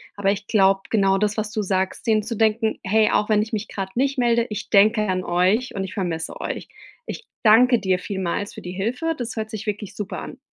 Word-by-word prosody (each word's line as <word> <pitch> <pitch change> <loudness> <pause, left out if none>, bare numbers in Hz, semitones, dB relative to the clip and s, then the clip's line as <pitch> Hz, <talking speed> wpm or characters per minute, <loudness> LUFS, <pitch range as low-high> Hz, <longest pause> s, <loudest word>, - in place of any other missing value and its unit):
Aber 195 -1 +1
ich 205 +1 -4
glaube 195 -2 +3
genau 195 -3 +3
das, 210 +1 0
was 215 -1 -2
du 215 0 -2
sagst, 190 +2 -1
den 220 -2 +3
zu 230 +2 -5
denken: 220 0 +1
„Hey, 215 +3 +3
auch 210 - +1
wenn 210 -1 +4
ich 215 - -4
mich 215 -1 -3
gerade 195 -1 -5
nicht 270 +2 0
melde, 235 -1 +3
ich 210 -1 -5
denke 215 +2 +5
an 185 -1 -1
euch 185 +9 +1
und 195 - -3
ich 190 - -7
vermisse 170 -5 -3
euch.” - - -4 0.4
Ich 465 - -6 0.2
danke 240 +2 +6
dir 190 -2 +1
vielmals 190 +1 -3
für - - -9
die 180 - -7
Hilfe. 250 - -2
Das 240 -2 -5
hört 220 0 -3
sich 215 -2 -6
wirklich 210 -1 -4
super 200 -3 -5
an. - - -9
210 Hz, 230 wpm, -23 LUFS, 195-225 Hz, 0.4 s, danke